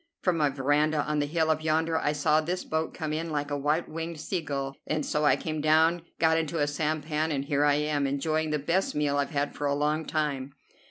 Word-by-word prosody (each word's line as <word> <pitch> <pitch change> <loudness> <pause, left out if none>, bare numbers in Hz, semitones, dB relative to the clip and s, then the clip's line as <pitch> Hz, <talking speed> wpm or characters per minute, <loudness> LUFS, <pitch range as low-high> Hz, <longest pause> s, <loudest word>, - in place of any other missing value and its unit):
From 180 -2 +2
my 150 -2 +3
veranda 145 +3 +1
on 150 0 0
the 145 - 0
hill 160 +1 +1
up 155 0 -1
yonder 160 +1 +1
I 150 - +1
saw 150 +1 +2
this 180 +4 -3
boat 160 0 -2
come 155 -3 -4
in, 165 +2 -2
like 145 -1 -2
a - - 0
white 150 +4 0
winged 165 0 -5
sea 175 +3 -2
gull, 135 -2 -4
and 155 -1 -1
so 150 0 0
I - - +5
came 155 -2 -4
down, 160 +3 +4 0.2
got 160 0 +3
into 165 +1 -2
a 145 - +2
sampan, 155 +1 -1
and 140 -2 -1
here 145 0 +1
I 145 -1 +4
am, 150 -1 0
enjoying 155 +3 0
the 150 - +1
best 170 +6 0
meal 145 -1 +1
I've 140 - 0
had 145 -2 -1
for 145 - -2
a 140 - +1
long 150 +2 0
time. 140 -3 -2
150 Hz, 235 wpm, -28 LUFS, 145-160 Hz, 0.2 s, I